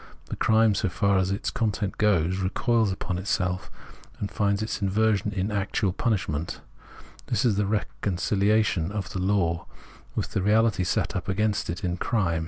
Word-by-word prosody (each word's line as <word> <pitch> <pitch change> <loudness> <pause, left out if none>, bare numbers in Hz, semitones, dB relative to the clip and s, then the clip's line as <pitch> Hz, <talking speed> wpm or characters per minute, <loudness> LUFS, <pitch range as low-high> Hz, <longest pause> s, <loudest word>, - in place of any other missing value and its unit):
The - - -3
crime, 110 -1 +4
so 100 -1 0
far 100 0 +2
as 95 0 +1
its 100 +4 -2
content 105 -3 -1
goes, 95 -3 +2
recoils 110 +3 +1
upon 95 -1 -3
itself, 90 -1 -1 0.6
finds 100 +1 0
its 110 - -3
inversion 105 +1 +1
in 100 +1 -2
actual 100 -1 0
punishment; 90 -8 -1 0.7
this - - 0
is 115 -4 +3
the 105 0 +1
reconcihation 100 -2 +1
of 100 -1 -4
the 95 - -2
law 90 -3 0 0.5
with - - -2
the - - 0
reality 105 0 +3
set 90 - -1
up - - -3
against 105 +1 0
it 85 +4 -4
in 90 -1 -1
crime. 95 -7 0
100 Hz, 160 wpm, -26 LUFS, 95-105 Hz, 0.7 s, crime